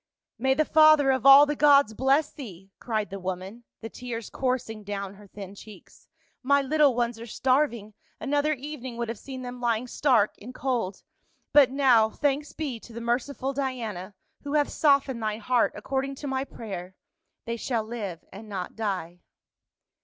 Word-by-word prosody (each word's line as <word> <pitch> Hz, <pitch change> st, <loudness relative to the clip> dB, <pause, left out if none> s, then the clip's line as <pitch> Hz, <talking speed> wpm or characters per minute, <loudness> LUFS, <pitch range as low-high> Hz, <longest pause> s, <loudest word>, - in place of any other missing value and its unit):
"May 265 Hz, +2 st, +2 dB
the 310 Hz, -, +2 dB
father 310 Hz, -3 st, +6 dB
of 260 Hz, 0 st, +1 dB
all 275 Hz, +1 st, +10 dB
the 295 Hz, 0 st, -2 dB
gods 285 Hz, -6 st, +5 dB
bless 275 Hz, +5 st, +2 dB
thee," 195 Hz, -, -10 dB
cried 215 Hz, -4 st, -2 dB
the 195 Hz, -, -5 dB
woman, 190 Hz, +5 st, -6 dB, 0.2 s
the 225 Hz, -, -6 dB
tears 235 Hz, -3 st, -7 dB
coursing 250 Hz, -5 st, -2 dB
down 200 Hz, -1 st, -5 dB
her 205 Hz, 0 st, -15 dB
thin 195 Hz, 0 st, -9 dB
cheeks. 200 Hz, -2 st, -15 dB, 0.2 s
" -, -, -39 dB
My 280 Hz, +2 st, +3 dB
little 285 Hz, -1 st, +3 dB
ones 240 Hz, -1 st, -1 dB
are 230 Hz, -, -8 dB
starving, 245 Hz, -4 st, 0 dB, 0.3 s
another 290 Hz, +2 st, +1 dB
evening 260 Hz, -3 st, -7 dB
would 235 Hz, -1 st, -3 dB
have 230 Hz, -, -5 dB
seen 260 Hz, -2 st, -8 dB
them 245 Hz, 0 st, -7 dB
lying 235 Hz, 0 st, 0 dB
stark 250 Hz, -4 st, +2 dB
and 250 Hz, +5 st, -10 dB
cold; 235 Hz, -8 st, -2 dB, 0.5 s
but 285 Hz, -3 st, +7 dB
now, 255 Hz, -5 st, +4 dB
thanks 290 Hz, +4 st, -1 dB
be 275 Hz, -7 st, -4 dB
to 230 Hz, -, -14 dB
the 235 Hz, -, -6 dB
merciful 260 Hz, +3 st, -2 dB
Diana— 225 Hz, -8 st, -4 dB, 0.3 s
who 285 Hz, +1 st, -4 dB
hath 290 Hz, -1 st, +2 dB
softened 275 Hz, -5 st, +2 dB
thy 215 Hz, -1 st, -2 dB
heart 240 Hz, +2 st, +1 dB
according 270 Hz, 0 st, -3 dB
to 285 Hz, -, -7 dB
my 265 Hz, 0 st, -2 dB
prayer 190 Hz, -7 st, -8 dB, 0.2 s
— -, -, -55 dB
they 230 Hz, 0 st, -3 dB
shall 235 Hz, -1 st, -2 dB
live 215 Hz, -7 st, -6 dB
and 210 Hz, +3 st, -10 dB
not 185 Hz, -3 st, -5 dB
die." 185 Hz, -5 st, -3 dB
245 Hz, 175 wpm, -26 LUFS, 215-275 Hz, 0.5 s, all